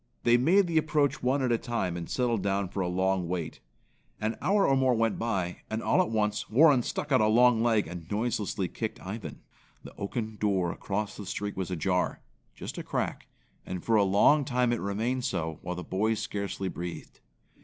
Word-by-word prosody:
They 120 - +5
made 170 +11 +4
the 165 -2 +2
approach 150 -2 +1
one 130 +2 +1
at 125 - +1
a 115 - +2
time, 105 -8 -2
and 85 -1 -6
settled 120 -5 0
down 100 -1 0
for 100 - -5
a 90 - 0
long 95 0 0
wait. 85 -2 -4 0.6
An 110 +1 -1
hour 200 +2 +3
or 135 - +4
more 130 -2 +3
went 115 -1 0
by, 95 -6 -1
and 110 +1 -3
all - - +3
at - - -1
once 105 -2 -1
Warren 135 +3 +6
stuck 145 +4 -4
out 130 - +5
a 110 - +4
long 120 +1 +5
leg 115 -3 +2
and 85 -1 -8
noiselessly 105 -3 -1
kicked 110 -2 -4
Ivan. 105 +4 -7 0.4
The - - -12
oaken 110 +1 -4
door 95 -5 +1
across 105 +1 -3
the 105 - -8
street 100 +1 -4
was 95 -1 -3
ajar. 90 +1 0 0.4
Just - - -7
a - - -5
crack, - - -3 0.4
and 90 -2 -6
for 115 - +3
a 105 - +5
long 100 +10 +4
time 125 -3 +1
it 120 - -2
remained 115 +6 -1
so, 80 -8 -2
while 90 0 -4
the 90 - -5
boys 110 +5 0
scarcely 100 -1 -3
breathed. 85 -1 -7
110 Hz, 200 wpm, -28 LUFS, 95-125 Hz, 0.6 s, Warren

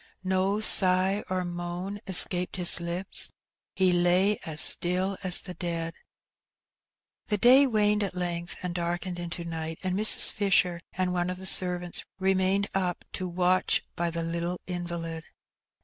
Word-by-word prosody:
No 190 +2 0
sigh 190 0 +3
or 185 -1 -1
moan 175 +3 -5
escaped 180 -1 +1
his 180 -1 +5
lips; 175 +3 -2 0.5
he 185 -1 +3
lay 180 +4 +2
as 155 -1 -3
still 185 +4 +4
as 185 -3 +2
the 180 - -8
dead. 170 -2 -4 1.3
The 210 - 0
day 255 +6 +6
waned 210 -3 +1
at 195 -2 -4
length 175 -1 -4
and 180 -1 -3
darkened 175 +1 -3
into 175 0 -5
night, 160 -1 -5
and 185 -1 -1
Mrs. 215 +2 +5
Fisher 185 -4 +1
and 185 -1 -1
one 175 0 -1
of 180 - -4
the 190 - -10
servants 180 -2 -2
remained 190 +1 +1
up 180 -2 -2
to 185 - -4
watch 180 +1 +1
by 170 0 -1
the 165 0 -4
little 170 +2 -3
invalid. 170 -2 -5
180 Hz, 150 wpm, -27 LUFS, 175-190 Hz, 1.3 s, day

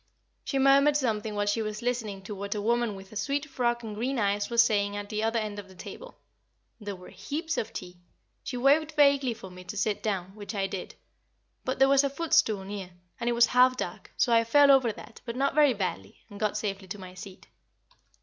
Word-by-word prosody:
She 275 - -2
murmured 275 +2 +5
something 220 -5 -1
while 205 0 0
she 205 +2 0
was 215 +1 -4
listening 225 -6 -2
to 210 - -6
what 200 +1 -4
a - - -2
woman 235 -1 +1
with 195 0 -12
a - - -12
sweet 280 +8 -1
frock 240 -4 -1
and 220 -2 -6
green 250 +6 -2
eyes 205 -1 0
was 235 -1 +5
saying 205 -2 0
at 205 0 -6
the 215 -1 -2
other 225 +1 +1
end 210 -2 -3
of 200 - -9
the 190 - -16
table. - - -10 0.6
There 205 -2 -5
was 180 +1 -13 0.2
heaps 320 +2 -2
of 225 - -3
tea. 180 -1 -8 0.4
She 250 - -4
waved 295 +5 +3
vaguely 280 -5 +4
for 190 -3 -11
me 180 0 -11
to 210 - -7
sit 205 +1 0
down, 190 -3 -2
which 210 +1 -7
I 195 -1 0
did; 195 -1 -6 0.7
but 260 - -2
there 270 - +5
was 275 0 +5
a 280 - +1
footstool 295 -9 +2
near, 195 -1 -6 0.3
and 240 0 0
it - - +1
was 235 0 +6
half 255 +1 +4
dark, - - -6
so 240 - +3
I 230 0 +5
fell 285 +5 +6
over 260 -4 +4
that, 220 +2 -12
but 235 -1 -6
not 275 +2 +1
very 290 -4 +4
badly, 100 - -4
and 200 - -9
got 210 -1 0
safely 195 -2 -4
to 185 - -6
my 185 -2 -10
seat. 185 0 -11
220 Hz, 225 wpm, -28 LUFS, 200-260 Hz, 0.7 s, was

